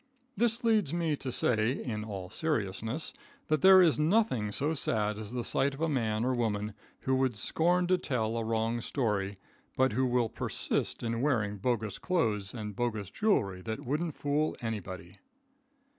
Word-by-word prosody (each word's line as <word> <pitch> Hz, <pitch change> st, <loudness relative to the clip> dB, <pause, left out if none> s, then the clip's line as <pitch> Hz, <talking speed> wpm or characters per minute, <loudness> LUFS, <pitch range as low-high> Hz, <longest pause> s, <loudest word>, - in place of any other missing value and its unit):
This 235 Hz, +1 st, +1 dB
leads 215 Hz, -9 st, +2 dB
me 165 Hz, -3 st, +1 dB
to 130 Hz, -, -4 dB
say, 115 Hz, 0 st, +2 dB
in 110 Hz, -6 st, -4 dB
all 95 Hz, -4 st, -6 dB
seriousness, 115 Hz, -2 st, -2 dB, 0.4 s
that 155 Hz, -2 st, +2 dB
there 190 Hz, -1 st, +9 dB
is 160 Hz, -3 st, +3 dB
nothing 150 Hz, -, +2 dB
so 145 Hz, +9 st, 0 dB
sad 105 Hz, -7 st, 0 dB
as 105 Hz, -2 st, -7 dB
the 125 Hz, -1 st, -3 dB
sight 135 Hz, +3 st, +1 dB
of 145 Hz, -, -10 dB
a 165 Hz, -, +2 dB
man 115 Hz, -6 st, 0 dB
or 130 Hz, -, +1 dB
woman 105 Hz, -3 st, -1 dB, 0.3 s
who 130 Hz, -, 0 dB
would 130 Hz, -3 st, +1 dB
scorn 175 Hz, -, +2 dB
to 180 Hz, 0 st, +2 dB
tell 115 Hz, -4 st, -1 dB
a 115 Hz, -, -1 dB
wrong 115 Hz, +1 st, 0 dB
story, 105 Hz, -7 st, -1 dB, 0.4 s
but 130 Hz, -4 st, +3 dB
who 130 Hz, +3 st, +2 dB
will 120 Hz, -1 st, +2 dB
persist -, -, -2 dB
in 115 Hz, 0 st, -1 dB
wearing 110 Hz, -8 st, +1 dB
bogus 110 Hz, -2 st, -1 dB
clothes 110 Hz, -, 0 dB
and 105 Hz, -3 st, -6 dB
bogus 110 Hz, -5 st, -2 dB
jewelry 100 Hz, -, +1 dB
that 110 Hz, +3 st, -5 dB
wouldn't 150 Hz, +4 st, -1 dB
fool 145 Hz, +2 st, 0 dB
anybody. 95 Hz, -6 st, -6 dB
120 Hz, 170 wpm, -30 LUFS, 105-150 Hz, 0.4 s, there